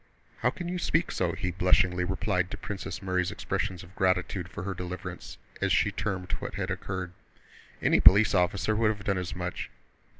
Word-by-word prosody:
"How - - +3
can 175 - -6
you 180 +1 -2
speak 165 0 +1
so!" 85 -2 0
he 90 - -2
blushingly 90 0 +3
replied 95 0 0
to - - -5
Princess 105 -2 -6
Mary's 90 -1 0
expressions 90 -2 -3
of 90 +2 -15
gratitude 90 -1 0
for 90 - -6
her 100 0 -2
deliverance, 90 0 -6 0.2
as - - +1
she - - +3
termed 95 -4 -3
what - - -5
had - - -2
occurred. 95 -2 -4 0.7
"Any - - +4
police 105 +2 +8
officer 95 +3 +2
would 110 0 +3
have 105 -2 -3
done 100 -2 +1
as 90 -1 -4
much! 90 0 -4
95 Hz, 180 wpm, -28 LUFS, 90-100 Hz, 0.7 s, police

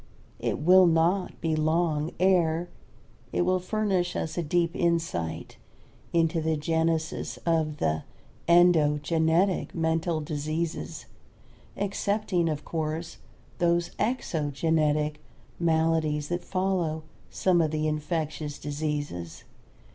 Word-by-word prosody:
It - - -1
will 180 +4 +6
not 170 +3 +1
be 160 -2 0
long 155 0 +1
ere 175 -2 +2 0.6
it - - +1
will 185 +1 +2
furnish 185 -2 -1
us 160 - -3
a 175 - 0
deep 170 +2 0
insight 160 - -1 0.5
into 165 -1 +2
the 160 0 0
genesis 160 +1 -1
of 160 -3 +1
the 80 - 0 0.5
"endogenetic 165 +1 +3
mental 165 0 0
diseases," 155 +2 -3 0.7
excepting, 200 -3 0
of 150 -1 -4
course, 160 +1 -3 0.4
those 170 0 +2
"exogenetic" 155 - 0 0.4
maladies 160 -3 +1
that 175 0 -2
follow 185 -5 -1 0.3
some 180 -2 +2
of 160 - +1
the 155 0 -1
infectious 155 -1 -3
diseases. 145 - -4
160 Hz, 100 wpm, -27 LUFS, 155-175 Hz, 0.7 s, will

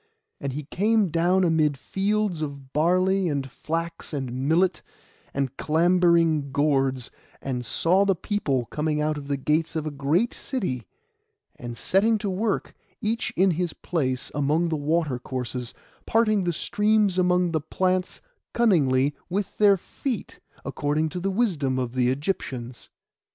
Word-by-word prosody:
And 140 -2 -3
he 150 +3 -4
came 210 +6 +1
down 175 +3 +2
amid 155 -4 +2
fields 195 +1 -1
of 140 -3 -6
barley, 185 +4 +2
and 140 -2 -2
flax, 165 +5 -4
and 135 -4 -3 0.2
millet, 175 +3 +2 0.5
and 135 -1 -2
clambering 165 -3 +3
gourds; 135 -3 +1 0.3
and 125 -2 -3
saw 175 - +3
the 195 -1 +2
people 155 - -1
coming 150 +3 -1
out 155 0 0
of 145 -1 -7
the 140 -1 -1
gates 155 +4 0
of 155 -1 -2
a 155 - -3
great 150 - +1
city, 130 - -3 0.7
and 120 -1 -7
setting 215 - +2
to 205 -2 -3
work, 205 +3 -1 0.3
each 225 +2 -1
in 190 +1 +4
his 175 0 -1
place, 130 -7 -2
among 150 +4 +1
the 160 - 0
water 150 -3 0
courses, 125 -1 -4 0.4
parting 215 -4 +2
the 175 - +1
streams 210 +1 +2
among 180 -1 +2
the 160 -2 0
plants 185 +4 -1 0.3
cunningly 145 - +3 0.2
with 195 +2 -3
their 205 -2 +6
feet, 240 +5 -5 0.3
according 145 +3 -1
to 180 - -5
the 195 +2 -1
wisdom 175 - 0
of 125 -2 -2
the 125 -1 +2
Egyptians. 130 -4 -3
160 Hz, 145 wpm, -25 LUFS, 140-190 Hz, 0.7 s, their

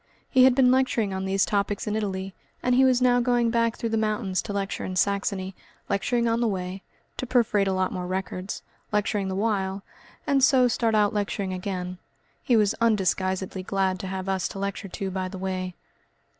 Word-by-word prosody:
He 255 -1 +6
had 260 -1 +5
been 255 -2 +5
lecturing 250 -6 +1
on 190 0 -3
these 195 0 +2
topics 200 0 -1
in 210 - -1
Italy, 195 -3 -3 0.3
and 250 - +2
he 260 +2 +5
was 255 -1 +4
now 245 -1 +4
going 240 -1 +2
back 230 -1 +1
through 230 - -2
the 225 - +1
mountains 210 -3 0
to 210 - -6
lecture 200 -1 -3
in 185 - -4
Saxony, 195 0 0 0.4
lecturing 235 +4 +1
on 230 +1 +1
the 235 - +2
way, 190 -1 -3 0.4
to 255 - -4
perforate 225 -5 +2
a - - +1
lot 185 0 0
more 180 -1 -4
records, 185 +1 -4 0.3
lecturing 210 -1 0
the 190 - -3
while, 195 -2 -1 0.4
and 275 -2 +2
so 255 -2 +6
start 230 -1 +1
out 210 -1 +3
lecturing 200 -2 -2
again. 180 -1 -4 0.4
He 245 -6 +3
was 210 -2 +3
undisguisedly 190 -3 +1
glad 190 0 0
to 190 - -5
have 190 0 -4
us 190 -1 0
to - - -9
lecture 200 +1 -3
to 195 +1 -4
by 185 0 -2
the 190 +1 -7
way. 185 -1 -3
200 Hz, 200 wpm, -26 LUFS, 190-230 Hz, 0.4 s, He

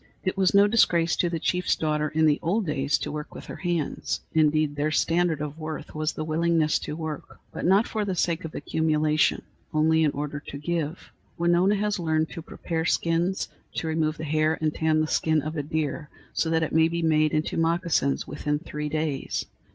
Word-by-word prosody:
It 185 - -1
was 190 0 +2
no 200 0 +7
disgrace 175 -6 +3
to 175 - +2
the 170 - -2
chief's 180 +3 +1
daughter 150 -1 0
in 155 +1 +2
the 150 -1 +3
old 195 +6 0
days 145 -2 +1
to - - -4
work 150 0 -6
with - - -9
her - - -8
hands. 175 -5 -2
Indeed, 155 -2 +2
their 145 +1 0
standard 165 0 +1
of 150 +1 -5
worth 155 0 -6
was 155 0 -1
the 155 - -4
willingness 160 0 +2
to 150 - -5
work, 160 -2 -6
but - - -4
not 195 +5 +4
for 215 -1 -2
the 195 -2 -2
sake 170 0 0
of 160 - -7
accumulation, 155 0 +1 0.3
only 160 +1 +4
in 155 - +4
order 145 +1 -4
to 145 - -8
give. 165 +1 -3 0.3
Winona 175 +4 +3
has 210 -1 -1
learned 160 -2 0
to 165 - -6
prepare 160 0 -4
skins, 170 +3 0 0.3
to - - -2
remove 160 -1 0
the 155 - -6
hair 155 +1 +1
and 155 -1 0
tan 155 -1 +2
the - - +1
skin 155 0 +2
of 155 +2 -4
a 150 - -1
deer 150 0 -3 0.2
so 165 - 0
that 160 0 +2
it 160 - -3
may 160 0 +5
be 170 0 -2
made 155 -1 +3
into 155 +1 -1
moccasins 165 -4 +1
within 150 0 -2
three 150 -1 -5
days. 155 -3 -2
160 Hz, 205 wpm, -26 LUFS, 150-170 Hz, 0.3 s, no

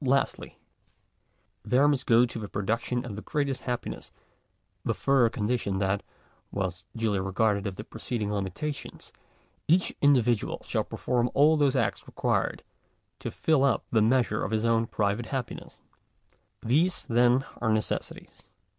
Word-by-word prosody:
Lastly 135 +1 0 1.1
there 130 +3 +3
must 140 -3 +1
go 120 +1 +6
to 115 -1 -6
the 105 -2 -6
production 115 +4 -1
of 110 -5 -6
the 105 - -6
greatest 140 -1 -2
happi 125 -1 -2
ness - - -9 0.7
the - - -1
further 135 -4 +3
condition, 105 -3 -1
that, 95 +1 0 0.5
whilst 95 -2 -4
duly 110 -3 +1
regardful 100 +1 +1
of 95 - -4
the 105 - -7
preceding 110 -1 -4
limitations, 105 - -5 0.5
each 180 +4 +3
individual 125 -6 +3
shall - - 0
perform 125 -1 -1
all 150 +3 +6
those 145 -3 +2
acts 115 -6 -1
required - - -1 0.6
to - - -4
fill 155 -4 +2
up 135 -4 +2
the 110 - +4
measure 115 -1 +2
of - - -2
his 110 +1 0
own 115 0 +2
private 105 +2 -1
happi 130 -2 -5 0.9
These 160 +10 +1
then 120 +3 +3
are 110 -2 0
necessities. 110 0 -3
115 Hz, 145 wpm, -28 LUFS, 105-135 Hz, 1.1 s, go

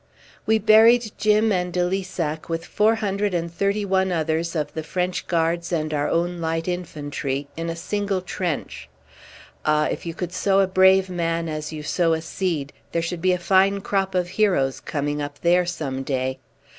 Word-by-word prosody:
We 220 0 +4
buried 220 +1 +5
Jim 215 +1 +3
and 180 -2 0
de 180 0 +1
Lissac 175 -5 -3
with 165 0 -3
four 220 +2 +2
hundred 205 -2 -1
and 170 0 -2
thirty 200 +3 0
one 190 -1 +1
others 165 0 -1
of 150 -2 -2
the 160 - -3
French 180 +3 -2
Guards 170 0 0
and 155 -2 -1
our 145 -1 0
own 175 +1 0
Light 165 +1 -2
Infantry 145 -5 -3
in 165 +1 -4
a 165 - -3
single 200 +2 -2
trench. 180 -3 -4 0.7
Ah! 150 0 +2
if - - -4
you 165 - -4
could 180 -1 -4
sow 195 +1 +2
a 195 - +5
brave 190 0 +5
man 170 -2 -1
as 155 -1 -4
you 155 -1 -6
sow 165 +2 +1
a 160 - -1
seed, 165 -7 -2 0.2
there 170 - 0
should 165 0 -4
be 185 +1 +3
a - - +1
fine 195 +2 +3
crop 195 -1 -1
of 180 -1 0
heroes 180 -10 +1
coming 145 0 -3
up 145 0 -6
there 175 +1 +3
some 140 -7 -3
day! 130 -1 -2
175 Hz, 185 wpm, -23 LUFS, 160-190 Hz, 0.7 s, buried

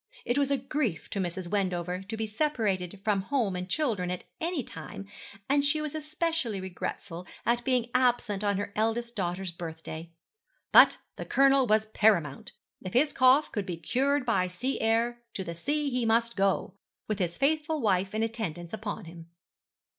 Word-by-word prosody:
It 240 +4 +1
was 280 -1 +2
a 280 - +2
grief 260 - -2
to 200 - -2
Mrs. 180 0 -3
Wendover 180 -2 -1
to 205 +4 -6
be 220 - -1
separated 210 - -1
from 205 -2 +2
home 215 -3 0
and 180 +1 -4
children 215 -9 0
at 180 0 -4 0.2
any 330 -4 -1
time, 160 +2 -8 0.4
and 280 +1 +3
she 285 +2 +2
was 305 -1 -3
especially 310 - -2
regretful 180 -1 -5 0.2
at 240 +1 +2
being 245 -2 +1
absent 245 -5 +2
on 200 -1 +1
her 205 0 -4
eldest 230 +2 0
daughter's 185 -1 -2
birthday; 165 -1 -7 0.6
but - - +8 0.2
the - - -5
Colonel 275 -1 +4
was 215 0 +3
paramount. 205 -10 +2 0.3
If 185 - -6
his 285 +4 +3
cough 260 +4 +5
could 205 -3 -3
be 175 -2 -3
cured 265 - +1
by 190 -6 +2
sea 250 +9 -2
air, 230 +2 +1
to 190 - -2
the 170 - -5
sea 290 - -1
he 250 -1 0
must 230 +1 +2
go, 195 -2 +1 0.3
with 215 -1 -2
his 175 -2 -1
faithful 305 +2 +1
wife 195 -3 +1
in 220 - +1
attendance 190 -7 -4
upon 215 -2 -4
him. 165 0 -11
220 Hz, 175 wpm, -29 LUFS, 185-260 Hz, 0.6 s, but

